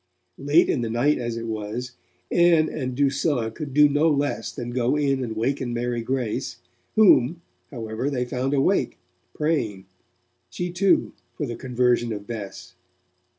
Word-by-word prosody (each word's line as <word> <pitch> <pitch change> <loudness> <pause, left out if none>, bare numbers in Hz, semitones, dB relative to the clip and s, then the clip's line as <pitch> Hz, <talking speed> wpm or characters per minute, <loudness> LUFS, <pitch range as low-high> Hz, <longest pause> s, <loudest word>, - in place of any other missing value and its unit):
Late 145 +5 +4
in 130 - 0
the 115 - -2
night 125 +7 +2
as 120 -1 -3
it 115 - -5
was, 110 +3 -4 0.4
Ann 170 -2 +4
and 130 -4 -4
Drusilla 140 -4 +1
could 145 +4 -7
do 150 +2 +6
no 145 +3 +2
less 145 -1 -1
than 120 0 -6
go 125 +2 +1
in 135 -3 +1
and 110 -3 -4
waken 120 +1 -1
Mary 120 0 -1
Grace, 125 -2 -2 0.4
whom, 170 - +5 0.3
however, 115 +1 -4
they 125 -3 -1
found 130 +3 -1
awake, 135 - +1 0.4
praying, 115 -12 -1 0.6
she 175 0 -4
too, 190 +2 +2 0.2
for 150 - -3
the 120 -3 -5
conversion 125 -2 +1
of 105 -1 -7
Bess. 105 -4 -7
130 Hz, 150 wpm, -24 LUFS, 120-145 Hz, 0.6 s, do